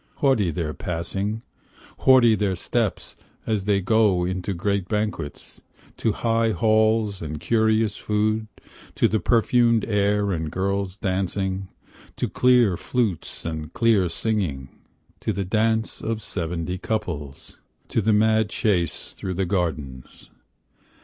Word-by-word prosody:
Haughty 130 -10 +2
their 80 -2 -3
passing, 95 +7 -3 0.6
Haughty 125 -4 +6
their 100 -3 0
steps 110 +4 -2 0.3
as 105 -3 -1
they 100 -1 +2
go 100 -3 +3
into 95 +2 -3
great 100 +1 -1
banquets, 105 -8 -4 0.4
To 110 - +1
high 115 0 +1
halls 110 -2 +2
and 75 -1 -5
curious 110 +3 +1
food, 110 +1 0 0.5
To - - +3
the 110 - 0
perfumed 115 0 +3
air 105 -1 +1
and 80 -3 -2
girls 100 +1 -1
dancing, 95 -1 -2 0.5
To - - -1
clear 125 -6 +4
flutes 110 -8 -2
and 80 -1 -4
clear 110 -6 +3
singing; 85 -8 -2 0.5
To - - -1
the 100 - -2
dance 110 +3 0
of 115 0 -2
the 110 - -11
seventy 90 0 -3
couples; 75 -11 -4 0.3
To 115 - +1
the 110 +2 +2
mad 110 0 +3
chase 90 - -1
through 95 -1 -5
the 95 +1 0
gardens. 80 -9 -4
100 Hz, 130 wpm, -24 LUFS, 90-110 Hz, 0.6 s, Haughty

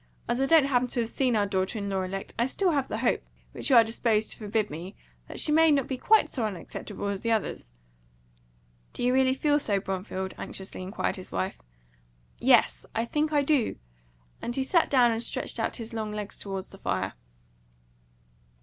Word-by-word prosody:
As 245 - 0
I 270 - +2
don't 320 -2 +6
happen 250 -2 +2
to 245 0 -1
have 225 - -2
seen 255 -2 +1
our 205 -1 +3
daughter 190 +2 -1
in 200 -1 -3
law 195 -1 -1
elect, 195 +1 -5
I - - +3
have 245 - +2
still 370 +5 +1 0.2
the - - -3
hope - - +1 0.3
which - - -3
you're 240 -4 +8
disposed 225 -1 0
to - - -10
forbid 210 0 -1
me 175 +6 -7 0.3
that - - -6
she 300 - +3
may 320 +1 +6
not 280 -4 +3
be 265 - -2
quite 430 - +4
so 260 -6 -3
unacceptable 205 0 -5
as 200 -1 -3
the 230 - 0
others." 200 - -2 1.2
"Do - - -4
you 250 +1 +3
really 260 0 +3
feel 290 +1 +2
so, 205 -8 +1
Bromfield?" 190 0 -4
anxiously 190 -1 -5
inquired 190 +3 -2
his 185 - -10
wife. 190 - -3 0.8
"Yes - - +4
I 230 - +1
think 300 +5 0
I 290 -2 +3
do;" 275 -5 +2 0.7
and 240 - -3
he 270 - 0
sat 335 +5 +2
down, 250 -3 +5
and 225 0 -1
stretched - - -2
out - - -1
his 230 -1 -5
long 215 -2 -3
legs 210 -1 -5
toward 195 -1 -4
the 195 - -15
fire. 95 0 -2
225 Hz, 200 wpm, -27 LUFS, 195-265 Hz, 1.2 s, you're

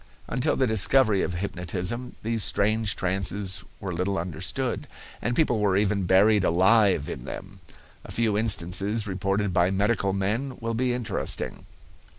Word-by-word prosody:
Until 125 +1 0
the 130 - +2
discovery 110 -1 +3
of 90 - -2
hypnotism 95 +6 -3
these 115 -1 -1
strange 110 +1 +1
trances 95 +1 -1 0.2
were 95 -2 -4
little 95 +3 -1
understood, 90 +9 -3 0.3
and 120 +2 -1
people 125 -8 +2
were 100 -2 +2
even 100 -1 +1
buried 100 +2 +5
alive 95 -2 +4
in - - -6
them. 95 +1 -8 0.4
A - - -10
few 115 -3 +1
instances 105 +1 0
reported 95 0 -1
by 85 +1 +3
medical 100 +1 +1
men 110 +8 -2
will 115 0 -3
be 125 +2 0
interesting. 120 -2 -2
100 Hz, 145 wpm, -26 LUFS, 95-115 Hz, 0.4 s, buried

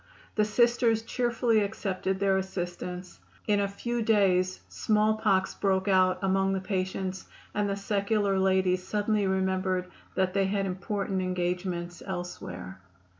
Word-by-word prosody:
The 215 - +2
Sisters 235 0 +3
cheerfully 235 -1 +1
accepted 195 -2 -2
their 195 -1 +3
assistance. 180 -1 -5 0.3
In 205 -1 +2
a 200 - +1
few 235 +4 -3
days 190 -4 +2
small 215 0 +2
pox 190 -3 +2
broke 190 -1 0
out 185 -1 +4
among 195 0 +2
the 190 - 0
patients 190 -1 -3 0.3
and 205 -1 0
the 200 - 0
secular 200 0 +1
ladies 190 -1 +2
suddenly 205 +1 0
remembered 190 -1 0 0.3
that 190 -1 +1
they 195 -1 +2
had 195 0 0
important 195 0 -2
engagements 180 -1 -2
elsewhere. 95 - -6
190 Hz, 130 wpm, -28 LUFS, 185-205 Hz, 0.3 s, out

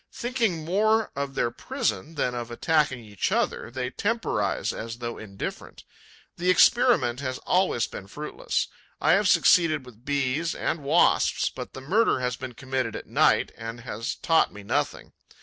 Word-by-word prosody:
Thinking 230 -10 -1
more 215 +5 +2
of 140 -1 -3
their 120 - +1
prison 110 - -3
than 125 -4 0
of 120 -1 -4
attacking 145 0 +1
each 100 -2 -2
other, - - 0
they 125 0 -4
temporize, 225 +2 -1
as 115 +1 -6
though 120 -1 -5
indifferent. 100 -3 -7 0.5
The 180 +1 0
experiment 185 - +4
has 130 -2 -3
always 180 - +2
been 95 - -9
fruitless. 285 - -3 0.3
I - - +3
have - - +4
succeeded 155 -6 +4
with 120 -2 -15
Bees 145 +3 0
and 160 -1 -2
Wasps, 140 - +3
but - - -8
the 130 - -8
murder 200 - +2
has 125 -1 -1
been 125 0 -7
committed 130 -1 -3
at - - -6
night - - +3
and 115 +1 -7
has 115 -2 -4
taught 165 -1 +2
me 105 0 -11
nothing. - - -2
130 Hz, 160 wpm, -26 LUFS, 120-170 Hz, 0.5 s, experiment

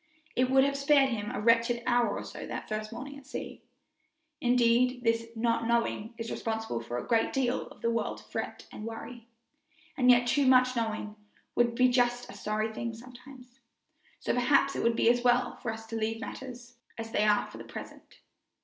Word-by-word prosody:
It 255 0 +2
would 265 0 +5
have 280 0 +1
spared 275 -1 +4
him 210 -3 -3
a 250 - -4
wretched 230 +2 +3
hour 240 -4 +2
or - - -5
so - - -8
that - - -5
first 215 0 -4
morning 275 +4 -7
at 270 - -19
sea. - - -7 0.8
Indeed, 245 +1 +3
this 230 0 +1
not 230 0 0
knowing 235 -1 0
is 230 0 -5
responsible 220 - -3
for 120 +1 -5
a - - -4
great 230 -2 +2
deal 255 -2 0
of - - -16
this 230 - +2
world's 230 -2 -2
fret - - -5
and 215 - -8
worry, 230 +1 -8 0.7
and 250 -1 +3
yet 245 0 +6
too 270 +3 +2
much 255 0 +5
knowing 220 -2 -3 0.4
would 240 -1 +2
be 255 +1 +5
just 245 -1 +1
as - - -11
sorry 215 +1 -1
a - - -12
thing 230 +1 -4
sometimes; 250 +1 -14 0.6
so - - -1
perhaps 275 +3 +3
it - - -1
would 230 0 +2
be - - +2
as 240 +1 +4
well 245 0 +2
for 225 - -3
us 220 0 -8
to 225 0 -7
leave 225 0 -1
matters 250 -1 -8 0.2
as 225 0 -6
they 210 - +2
are 210 -1 +3
for - - -10
the - - -7
present. - - -11
240 Hz, 200 wpm, -29 LUFS, 225-250 Hz, 0.8 s, yet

